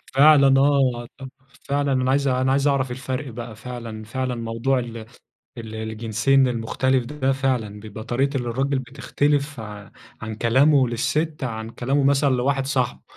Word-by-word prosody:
فعلًا 140 -2 +6
آه، 130 -4 +2 0.6
فعلًا 140 0 +1
أنا 130 0 +1
عايز 140 0 +2
أنا 130 0 +1
عايز 140 +1 +2
أعرف 130 -3 +1
الفرق 130 +2 -4
بقى 120 -2 -7
فعلًا، 115 -2 -7
فعلًا، 125 +3 -3
موضوع 115 +3 -1
ال 120 -1 -6 0.6
ال 110 -1 -7
الجنسين 115 +4 +1
المختلف 125 +2 0
ده 135 -1 -1
فعلًا، 125 -6 -1
بيبقى 110 +1 -9
طريقة 135 +4 -1
الرجل 130 +3 -1
بتختلف 140 +1 -1
ع 105 -2 -9 0.3
عن 110 -1 -5
كلامه 130 +4 +4
للست 150 +6 -1
عن 110 -2 -4
كلامه 135 +5 -1
مثلًا 140 +1 +3
لواحد 135 +2 0
صاحبه، 130 -4 -1
130 Hz, 145 wpm, -23 LUFS, 115-140 Hz, 0.6 s, فعلًا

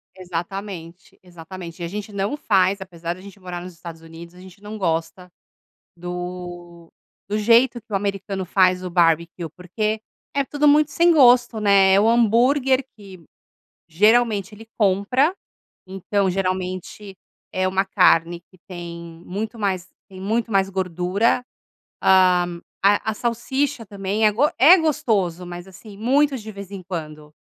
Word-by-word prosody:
Exatamente, 180 -1 -7
exatamente. 175 0 -10
E - - -2
a - - -4
gente 210 +4 -6
não 200 +7 -2
faz, 195 -5 +2
apesar 170 -2 -5
da 185 - -14
gente 200 +1 -13
morar 180 -2 -7
nos 180 0 -9
Estados 165 -1 -11
Unidos, 165 +1 -12
a - - -15
gente 185 +1 -15
não 210 +1 -8
gosta 175 0 -2 0.7
do 175 -1 -8 0.3
do 210 +2 -2
jeito 235 +3 +4
que - - -43
o 200 - 0
americano 195 -1 -3
faz 185 0 +2
o 180 - -4
barbecue, 170 0 +1
porque 210 +4 -2 0.4
é 280 - +2
tudo 290 +2 +1
muito 300 0 +4
sem 340 +5 +3
gosto, 245 -6 +5
né. 200 -2 +5
É 195 - +5
o 210 - +3
hambúrguer 250 +4 +3
que, 190 -4 -13 0.6
geralmente, 210 +3 +2
ele 225 +2 -14
compra. 220 - +2 0.5
Então 195 +1 -1
geralmente 185 +1 -4 0.4
é 185 0 0
uma 190 +1 0
carne 175 -3 +3
que 185 - -21
tem 170 -2 -9
muito 220 +5 -5
mais 190 -3 -2 0.2
tem 190 -1 -12
muito 225 +4 -1
mais 195 -1 +2
gordura. 185 +5 0 0.6
Hã, 180 -2 +3 0.2
a 205 +2 +3
a - - -7
salsicha 240 +3 -2
também 200 +2 -1
é 210 - +3
go 280 +8 +2
é 320 +8 +8
gostoso. 200 - 0
Mas 175 +1 -8
assim, 200 +2 -13
muito 275 +5 +2
de 220 -1 -9
vez 200 -1 -10
em 195 -2 -7
quando. 155 -4 -7
195 Hz, 155 wpm, -22 LUFS, 180-220 Hz, 0.7 s, é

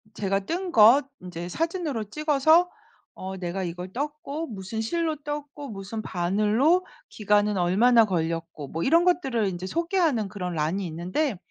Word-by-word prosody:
제가 195 0 0
뜬 355 - -3
것 235 +5 +7
인제 175 -1 -7
사진으로 315 - -2
찍어서 305 - +3 0.4
어 190 0 -7
내가 180 +1 -3
이걸 180 +2 -6
떴고 300 +3 -4
무슨 215 0 -5
실로 320 +6 -1
떴고 290 -1 -6
무슨 205 +1 -6
바늘로 215 - +1 0.2
기간은 210 -1 +1
얼마나 220 +6 +4
걸렸고 165 -5 -3
뭐 165 - -4
이런 335 +5 +4
것들을 270 - +1
인제 185 0 -4
소개하는 335 - 0
그런 180 -3 -5
난이 165 +6 -1
있는데 180 - -2
215 Hz, 310 characters per minute, -25 LUFS, 185-300 Hz, 0.4 s, 것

